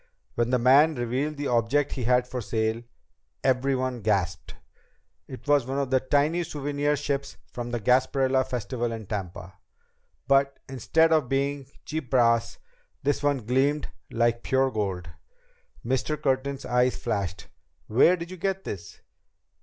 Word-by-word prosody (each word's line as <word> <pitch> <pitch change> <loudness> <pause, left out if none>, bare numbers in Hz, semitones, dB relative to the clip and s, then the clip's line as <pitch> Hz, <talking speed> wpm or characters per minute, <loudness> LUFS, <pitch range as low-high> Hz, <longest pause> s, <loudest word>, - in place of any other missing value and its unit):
When 120 0 0
the 125 - +3
man 140 +6 +5
revealed 130 +5 -2
the 145 - -3
object 125 +4 +1
he 125 - -3
had 125 +1 +3
for 125 -1 -4
sale, 110 +2 -1 0.6
everyone 130 -1 0
gasped. 95 -5 -1 0.7
It 130 +2 -10
was 145 -4 +3
one 135 +1 -2
of 140 -2 -1
the 130 - +4
tiny 145 +6 +1
souvenir 145 -2 -1
ships 140 -1 -3
from 120 -1 -5
the 120 0 -2
Gasparilla 130 +3 +2
Festival 120 -1 -3
in 110 -1 -6
Tampa. 95 -2 -6 0.7
But 140 0 +3
instead 160 +5 +2
of 150 -6 +2
being 140 0 -1 0.2
cheap 155 -5 -4
brass, 115 -2 +2 0.5
this 145 0 +1
one 145 -5 0
gleamed 135 +5 +1 0.2
like 115 0 +1
pure 135 0 +1
gold. 95 -5 -3 0.8
Mr. 130 +4 -1
Curtin's 135 -1 -1
eyes 125 +1 +2
flashed. 100 -7 -3 0.4
"Where 150 +11 +4
did 170 +1 -7
you 185 - -7
get 195 +2 -2
this?" 95 - -8
130 Hz, 145 wpm, -26 LUFS, 115-140 Hz, 0.8 s, man